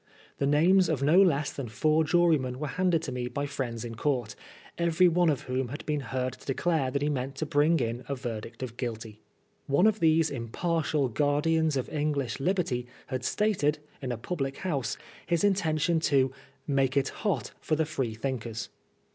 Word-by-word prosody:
The 140 - +1
names 175 +6 +4
of 145 -4 0
no 165 +7 +6
less 150 -6 +2
than 130 -5 -5
four 155 +7 +2
jurymen 155 -6 +2
were 150 +1 -3
handed 180 -3 +1
to 135 - -4
me 125 -1 -3
by 140 +4 -3
friends 125 -5 -4
in 115 - -6
court, 120 -2 -1 0.4
every 170 +1 +3
one 175 0 +3
of 145 - 0
whom 130 0 -2
had 140 +5 -7
been 150 -1 0
heard 130 -2 -2
to - - -15
declare 145 0 +1
that 140 +2 -1
he - - +1
meant 135 -1 -2
to 155 - -2
bring 155 +2 +3
in 120 +1 -2
a 140 - -1
verdict 115 -1 -6
of 120 -2 -6
Guilty. 110 -4 -5 0.5
One 140 +8 +3
of 215 -1 +3
these 160 -1 +3
impartial 145 +4 -1
guardians 150 +5 +1
of 130 - -2
English 145 -4 -1
liberty 140 -7 0 0.3
had 130 -1 -2
stated, 170 - +1 0.2
in 130 -2 -3
a 120 - -2
public 135 +1 -3
house, 140 - -2 0.3
his 170 0 +1
intention 170 -4 +2
to 135 -4 +2 0.2
" 140 - -34
make 135 -2 +1
it 135 -1 +2
hot 165 - -2
for 155 - 0
tiie 160 +1 +1
Free 130 -7 -3
thinkers." 115 -2 -4
145 Hz, 190 wpm, -28 LUFS, 130-160 Hz, 0.5 s, no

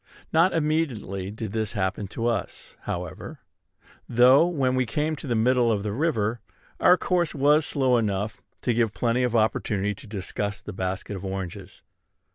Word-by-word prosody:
Not 165 +4 +5
immediately 145 - -1
did 110 0 -6
this 110 0 -2
happen 95 -1 -2
to 115 +4 -4
us, 115 -5 -3
however; 90 -2 -5 0.7
though, 125 +7 +6
when 135 -7 0
we 130 -1 +1
came 150 +6 -1
to 140 - -8
the 120 - 0
middle 120 +1 +3
of 100 -2 0
the 105 - -2
river, 115 -4 0 0.4
our 180 - +6
course 175 -4 0
was 145 +2 +4
slow 130 -3 +2
enough 105 -1 -2 0.2
to 120 - +2
give 115 -3 +1
plenty 120 +3 +1
of 125 -2 0
opportunity 105 -2 +1
to 125 +3 -14
discuss 100 0 -4
the - - -8
basket 95 +2 -3
of 95 - -7
oranges. 95 0 -6
115 Hz, 165 wpm, -25 LUFS, 100-135 Hz, 0.7 s, though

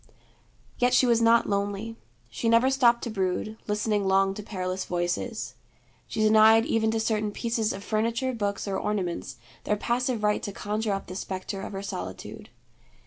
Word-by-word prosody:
Yet 245 0 +3
she 255 - +5
was 235 -1 +3
not 230 0 +4
lonely. 205 +2 -2 0.3
She 230 - -2
never 230 +3 +4
stopped 240 -3 +3
to 235 - -3
brood, 195 +1 -2
listening 210 -1 0
long 195 0 +3
to 210 - -7
perilous 185 -2 -3
voices. 180 +6 -2 0.5
She 220 - -3
denied 220 +1 +6
even 225 -6 +1
to 225 0 0
certain 215 -1 0
pieces 230 0 -1
of 195 - -6
furniture, 230 +5 0
books, 205 -3 -2
or 195 -1 -1
ornaments, 190 -5 -3 0.3
their 210 - 0
passive 240 0 -1
right 210 0 +2
to 205 - -4
conjure 210 +1 -2
up 195 - -4
the 185 - -8
spectre 190 +1 -5
of - - -7
her 195 0 -5
solitude. 95 - -7
215 Hz, 170 wpm, -27 LUFS, 195-230 Hz, 0.5 s, denied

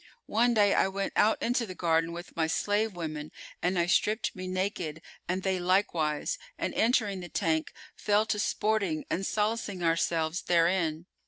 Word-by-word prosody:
One 235 +2 +2
day, 205 -2 +4
I - - +3
went 195 +1 -3
out 215 +1 +3
into 240 -1 +1
the 185 - -7
garden 165 -1 +1
with 175 +1 -8
my 160 -1 +1
slave 205 +5 0
women 155 -3 -5 0.3
and 180 +1 0
I 170 - +3
stripped 210 +5 +1
me 185 0 -6
naked 185 -4 -3 0.3
and 185 +1 -1
they 190 -1 0
likewise 175 - 0 0.2
and, - - -2
entering 220 -4 +2
the 175 -1 -8
tank, 160 0 0 0.2
fell 210 +1 +2
to 210 -1 -1
sporting 205 -7 0
and 190 +3 -1
solacing 210 -3 -1
ourselves 165 0 +1
therein. 170 -2 +1
185 Hz, 165 wpm, -29 LUFS, 165-210 Hz, 0.3 s, day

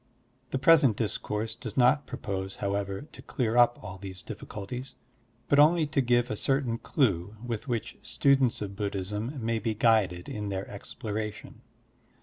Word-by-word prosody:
The - - -1
present 135 -5 +5
discourse 110 0 -2
does 115 -2 -8
not 130 +3 +4
propose, 95 -1 -4
however, 100 +2 -2
to - - -11
clear 120 -4 -1
up 120 0 +5
all 95 +1 -7
these 95 -1 -8
difficulties, 125 +6 -7 0.5
but 145 - +4
only 160 +2 +6
to 145 -1 +1
give 120 -1 +2
a - - -1
certain 130 -1 0
clue 100 - 0
with 115 +1 -4
which 120 -4 -3
students 135 -3 +2
of 100 -1 -6
Buddhism 105 +5 -3
may 115 0 +1
be 110 0 -2
guided 105 -6 +2
in 105 -1 -4
their 95 0 -3
exploration. 105 +1 -6
110 Hz, 150 wpm, -28 LUFS, 100-125 Hz, 0.5 s, only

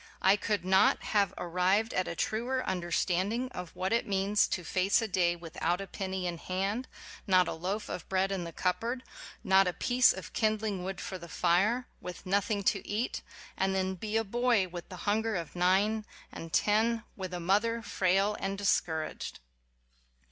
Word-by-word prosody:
I 190 +2 +6
could 205 -3 -1
not 190 0 +4
have 200 -3 +2
ar - - -4
rived 185 +6 +2
at 185 - 0
a 170 - -4
truer 245 +8 -1
understanding 185 +6 0
of 180 -8 -8
what 190 +3 -1
it 235 - +1
means 200 +1 +2
to 180 - -3
face 185 +4 +2
a 225 - -1
day 175 -3 +2
without 170 +1 -2
a 195 - -4
penny 190 0 -4
in 175 -2 -3
hand, 195 +8 -2 0.4
not 185 -2 +5
a - - -2
loaf 190 +6 -3
of 175 - -6
bread 190 +1 +1
in 190 -3 -2
the 170 - -6
cup 180 +2 0
board, 245 +2 -3 0.4
not 190 0 +5
a 180 - 0
piece 250 +5 +4
of 185 -2 -7
kindling 215 -4 0
wood 190 0 -4
for 185 - -5
the 170 0 -10
fire 190 +10 +2
ŌĆö 245 - -27
with 180 -1 -8
nothing 200 +2 0
to 195 +1 0
eat, 220 +4 -2 0.3
and 190 0 0
then 190 0 0
be 210 +4 -2
a 225 - +2
boy 235 -2 +2
with 175 -1 -8
the 185 - -8
hunger 220 +1 +1
of 170 -2 -5
nine 195 +5 +2 0.3
and 165 0 -8
ten, 225 +5 +2
with 185 -2 -5
a 180 - -4
mother 215 +6 +1
frail 195 +1 +1
and 195 0 -2
discour 160 -5 +1
aged! - - -8
195 Hz, 190 wpm, -30 LUFS, 180-215 Hz, 0.4 s, I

